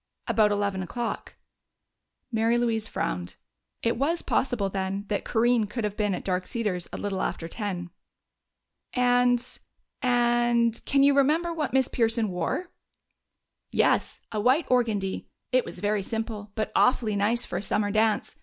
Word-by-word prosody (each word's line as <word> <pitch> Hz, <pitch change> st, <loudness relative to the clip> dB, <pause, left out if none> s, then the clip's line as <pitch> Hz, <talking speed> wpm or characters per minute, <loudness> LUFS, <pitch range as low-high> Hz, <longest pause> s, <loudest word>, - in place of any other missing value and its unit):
"About 215 Hz, -2 st, +3 dB
eleven 200 Hz, -2 st, 0 dB
o'clock." 235 Hz, +6 st, -4 dB, 1.0 s
Mary 225 Hz, +1 st, +2 dB
Louise 225 Hz, -2 st, 0 dB
frowned; 90 Hz, 0 st, -3 dB, 0.5 s
it 230 Hz, 0 st, +1 dB
was 320 Hz, +7 st, 0 dB
possible, 245 Hz, -6 st, 0 dB
then, 195 Hz, +1 st, -3 dB
that 205 Hz, -, -1 dB
Corinne 235 Hz, -1 st, +2 dB
could 230 Hz, +2 st, -4 dB
have 210 Hz, -1 st, -2 dB
been 205 Hz, -3 st, 0 dB
at -, -, -6 dB
Dark 180 Hz, -1 st, -1 dB
Cedars 205 Hz, -7 st, -2 dB
a -, -, -5 dB
little 195 Hz, -2 st, -2 dB
after 165 Hz, -, -2 dB
ten. 180 Hz, -3 st, -4 dB, 1.0 s
"And 245 Hz, -1 st, +2 dB, 0.4 s
and 240 Hz, -2 st, +2 dB
can 275 Hz, -1 st, +3 dB
you 280 Hz, 0 st, +6 dB
remember 310 Hz, +5 st, +2 dB
what 315 Hz, -2 st, -2 dB
Miss 265 Hz, -1 st, +3 dB
Pearson 225 Hz, -2 st, +1 dB
wore?" 180 Hz, -, -2 dB, 1.0 s
"Yes. -, -, +2 dB
A 215 Hz, -, -1 dB
white 260 Hz, +8 st, +3 dB
organdie. 215 Hz, -6 st, 0 dB, 0.2 s
It 255 Hz, -1 st, +3 dB
was -, -, -7 dB
very 205 Hz, 0 st, 0 dB
simple, 220 Hz, 0 st, -4 dB
but 215 Hz, -, -2 dB
awfully 230 Hz, -4 st, +3 dB
nice 220 Hz, +4 st, +1 dB
for -, -, -4 dB
a -, -, -5 dB
summer 205 Hz, 0 st, 0 dB
dance. 215 Hz, 0 st, +1 dB
225 Hz, 150 wpm, -27 LUFS, 205-245 Hz, 1.0 s, you